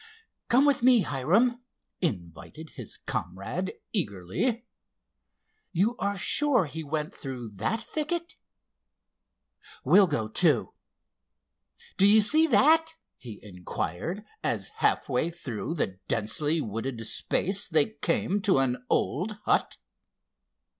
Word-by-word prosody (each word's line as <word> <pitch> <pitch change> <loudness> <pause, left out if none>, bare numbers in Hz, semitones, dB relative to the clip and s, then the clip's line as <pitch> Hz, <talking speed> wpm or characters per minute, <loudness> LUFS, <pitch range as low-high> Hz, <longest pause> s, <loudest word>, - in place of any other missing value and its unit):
"Come 260 +4 +4
with 285 -4 +3
me, 245 -2 +6
Hiram," 200 - +1 0.4
invited 95 - -5
his - - -7
comrade 110 - -4 0.2
eagerly. 195 - -1 1.1
"You 200 +7 +1
are 200 0 -1
sure 255 - +2
he 160 +2 -6
went 150 +1 -3
through 125 -4 -7
that 215 - -1
thicket? 320 +7 -3 1.5
We'll 200 -2 +6
go, 130 -9 -1
too. 145 +3 +1 1.2
Do 195 - +5
you 215 +2 +6
see 310 +9 +4
that?" 320 +6 +4 0.2
he 115 -5 -10
inquired, 90 - -5 0.2
as - - -1
half - - +1
way 135 +5 0
through 160 -3 -5
the 95 - -2
densely 145 +9 0
wooded 115 +1 -4
space 190 - 0
they 160 +4 +2
came 200 0 0
to 195 -5 +3
an 125 -2 0
old 190 +8 0
hut. - - +1
165 Hz, 115 wpm, -27 LUFS, -, 1.5 s, me